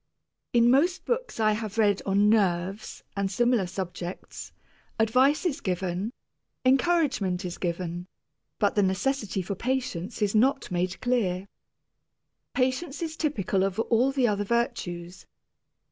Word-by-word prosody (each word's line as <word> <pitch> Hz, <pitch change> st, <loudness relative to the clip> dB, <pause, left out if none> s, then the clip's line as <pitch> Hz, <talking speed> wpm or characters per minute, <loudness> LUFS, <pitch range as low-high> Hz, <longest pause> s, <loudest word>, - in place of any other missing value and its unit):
In 240 Hz, 0 st, +5 dB
most 345 Hz, +8 st, +2 dB
books -, -, -2 dB
I 215 Hz, -1 st, +4 dB
have 215 Hz, 0 st, -3 dB
read 205 Hz, -3 st, +3 dB
on 200 Hz, +1 st, +4 dB
"nerves" 195 Hz, -1 st, 0 dB
and 200 Hz, -1 st, 0 dB
similar 240 Hz, -1 st, +2 dB
subjects, 180 Hz, -1 st, -6 dB, 0.5 s
advice 255 Hz, -, +3 dB
is 320 Hz, -6 st, -1 dB
given, 185 Hz, +3 st, -2 dB, 0.5 s
encouragement 260 Hz, -, +2 dB
is 175 Hz, -, -5 dB
given, 175 Hz, 0 st, -3 dB, 0.5 s
but 205 Hz, -3 st, +2 dB
the 205 Hz, -, +3 dB
necessity 195 Hz, +1 st, 0 dB
for 200 Hz, -, -3 dB
patience 230 Hz, -3 st, -2 dB
is 200 Hz, -, +1 dB
not 260 Hz, +3 st, +2 dB
made 180 Hz, +1 st, -1 dB
clear. 200 Hz, -7 st, 0 dB, 1.1 s
Patience 270 Hz, +5 st, 0 dB
is 320 Hz, -1 st, -4 dB
typical 205 Hz, -, 0 dB
of 195 Hz, -1 st, -1 dB
all 240 Hz, +4 st, +2 dB
the 265 Hz, -3 st, +2 dB
other 205 Hz, -1 st, 0 dB
virtues. 185 Hz, -6 st, -2 dB
210 Hz, 130 wpm, -27 LUFS, 185-255 Hz, 1.1 s, In